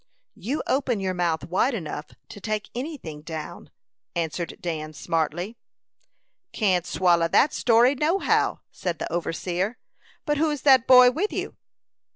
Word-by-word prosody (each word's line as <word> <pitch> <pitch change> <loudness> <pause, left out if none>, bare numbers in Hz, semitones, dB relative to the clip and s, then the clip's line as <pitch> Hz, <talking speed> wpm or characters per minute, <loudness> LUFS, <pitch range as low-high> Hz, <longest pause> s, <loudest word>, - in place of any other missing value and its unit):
"You 270 +9 -3
open 255 -5 0
your 190 -1 -1
mouth 170 -4 -1
wide 195 - +1
enough 155 -5 -5 0.2
to 205 - -10
take 215 +1 -3
any 290 +6 -4
thing 155 - -9
down," 155 -1 -7 0.5
answered 170 0 -3
Dan, 155 -3 -4
smartly. 165 - -2 0.9
"Can't 185 -5 +1
swallow 170 -2 +3
that 275 - +3
story, 240 +2 +4
no 305 +7 +1
how," - - +1
said 175 -3 -3
the - - -5
overseer. 180 +5 -2 0.5
"But 295 -2 0
who's 300 -3 0
that 260 -3 +5
boy 250 -1 +8
with 375 +11 -1
you?" - - -4
190 Hz, 145 wpm, -25 LUFS, 165-255 Hz, 0.9 s, boy